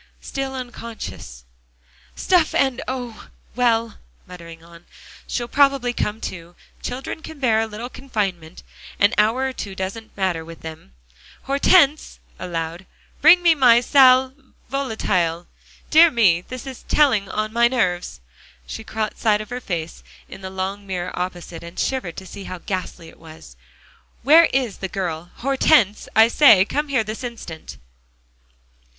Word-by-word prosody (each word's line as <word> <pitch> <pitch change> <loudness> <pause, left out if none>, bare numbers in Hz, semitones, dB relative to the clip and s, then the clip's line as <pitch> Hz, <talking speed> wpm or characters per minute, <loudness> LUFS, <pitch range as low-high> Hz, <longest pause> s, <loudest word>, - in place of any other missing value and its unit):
"Still 270 -1 -5
unconscious" 230 - -8 0.7
"Stuff 355 -4 +2
and 265 -3 +1
oh! 245 -3 -6 0.3
well," 230 -2 +1 0.3
muttering 165 -2 -12
on. 170 0 -16 0.4
"She'll 240 -1 -3
probably 275 -2 +2
come 210 -2 -2
to. 175 -1 -7 0.3
Children 260 +5 -5
can 315 -1 -10
bear 235 -5 +2
a 225 - -2
little 220 +3 -7
confinement; 195 -11 -5 0.3
an 200 +3 +3
hour 225 +5 +2
or 265 - -5
two 200 -5 -7
doesn't 195 +5 -6
matter 185 -4 -1
with 165 0 -12
them 155 - -10 0.5
Hortense!" 280 +2 +3 0.2
aloud, 170 0 -5 0.3
"bring 350 +4 +7
me 340 -1 +6
my 250 -6 +5
sal 260 0 +5 0.4
volatile. 185 -11 -1 0.5
Dear 330 +2 +8
me! 200 - +3
this 255 +7 -9
is 265 -2 -8
telling 230 -10 +2
on 215 +2 -3
my 235 0 +4
nerves." 185 - -2 0.4
She 65 - -7
caught 220 -1 -4
sight 210 -2 +2
of 215 +2 -9
her 250 +1 -4
face 165 - -5 0.3
in - - -11
the 190 - -6
long 190 +2 -5
mirror 180 -1 -4
opposite, 180 -2 -5
and 170 +1 -11
shivered 255 -11 -2
to 190 - -8
see 195 +1 -10
how 185 - -6
ghastly 180 -2 -5
it - - -19
was. 155 - -14 0.7
"Where 315 +6 +7
is 250 -8 -2
the 190 - -3
girl? 175 -3 -4
Hortense, 260 -5 +2
I 220 +1 +7
say, 230 -7 +6
come 295 +7 -2
here 260 -5 +1
this 215 +4 -7
instant!" 225 -10 -8
220 Hz, 145 wpm, -21 LUFS, 180-260 Hz, 0.7 s, Dear